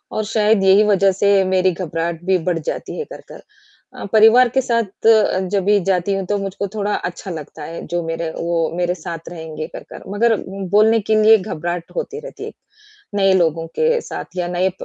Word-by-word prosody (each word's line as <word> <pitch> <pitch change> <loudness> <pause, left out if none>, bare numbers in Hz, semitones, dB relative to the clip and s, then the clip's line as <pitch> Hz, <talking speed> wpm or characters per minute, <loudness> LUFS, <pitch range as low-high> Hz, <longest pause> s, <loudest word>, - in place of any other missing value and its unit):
और 215 - 0
शायद 215 -2 +2
यही 195 +2 +6
वजह 195 -1 +4
से 195 +1 +3
मेरी 185 0 +2
घबराहट 170 -1 -4
भी 190 0 +3
बढ़ 170 -2 0
जाती - - -5
है 460 - -3
कर - - -10
कर। - - -11 0.5
अ, - - -7
परिवार 225 +3 +6
के 265 +3 +1
साथ 230 -4 -1
अ, 215 -4 +4
जब 200 -2 +1
भी 205 0 +4
जाती 185 +2 0
हूँ 195 -1 -3
तो 205 - 0
मुझको 195 0 -4
थोड़ा 210 -1 -1
अच्छा 180 +2 -5
लगता 155 -1 -8
है 165 +2 -7
जो 175 0 -2
मेरे 165 0 -3
वो 170 -1 0
मेरे 180 0 0
साथ 165 -1 -8
रहेंगे 160 -2 -7
कर - - -8
कर - - -10
मगर 225 +2 +3 0.4
बोलने 220 +2 +5
के - - +5
लिए 220 +1 +7
घबराहट 175 -3 -5
होती 455 -3 -4
रहती - - -10
है, - - -7 0.6
नए 195 -1 +3
लोगों 165 -3 +1
के 475 0 +2
साथ - - -8
या 175 -1 -1
नए 180 +1 0
190 Hz, 200 wpm, -19 LUFS, 170-215 Hz, 0.6 s, लिए